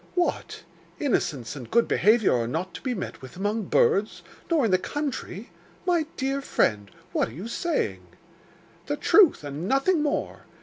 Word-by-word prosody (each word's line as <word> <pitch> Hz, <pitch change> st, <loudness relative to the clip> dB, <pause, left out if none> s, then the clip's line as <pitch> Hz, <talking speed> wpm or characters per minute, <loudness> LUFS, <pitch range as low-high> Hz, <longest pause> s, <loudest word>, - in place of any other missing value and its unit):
'What! 355 Hz, -1 st, -1 dB, 0.4 s
innocence 145 Hz, -, -1 dB
and 130 Hz, -5 st, -8 dB
good 235 Hz, 0 st, +3 dB
behaviour 215 Hz, 0 st, +4 dB
are 115 Hz, -1 st, 0 dB
not 165 Hz, +7 st, -3 dB
to -, -, -8 dB
be 255 Hz, -2 st, -2 dB
met 190 Hz, -, -6 dB
with 130 Hz, +5 st, -11 dB
among 205 Hz, +2 st, -1 dB
birds, 205 Hz, +3 st, +2 dB, 0.3 s
nor 320 Hz, -7 st, +3 dB
in 215 Hz, -, +1 dB
the 185 Hz, -, +4 dB
country! 265 Hz, -6 st, -4 dB, 0.3 s
My 340 Hz, -4 st, +2 dB
dear 270 Hz, +1 st, -1 dB
friend, 105 Hz, -, 0 dB, 0.2 s
what -, -, 0 dB
are -, -, -12 dB
you 180 Hz, -, -7 dB
saying?' 335 Hz, +8 st, -2 dB, 0.8 s
'The -, -, -1 dB
truth 380 Hz, -, +5 dB
and 145 Hz, +5 st, -5 dB
nothing 275 Hz, -, +2 dB
more. 295 Hz, -1 st, -2 dB
220 Hz, 165 wpm, -26 LUFS, -, 0.8 s, truth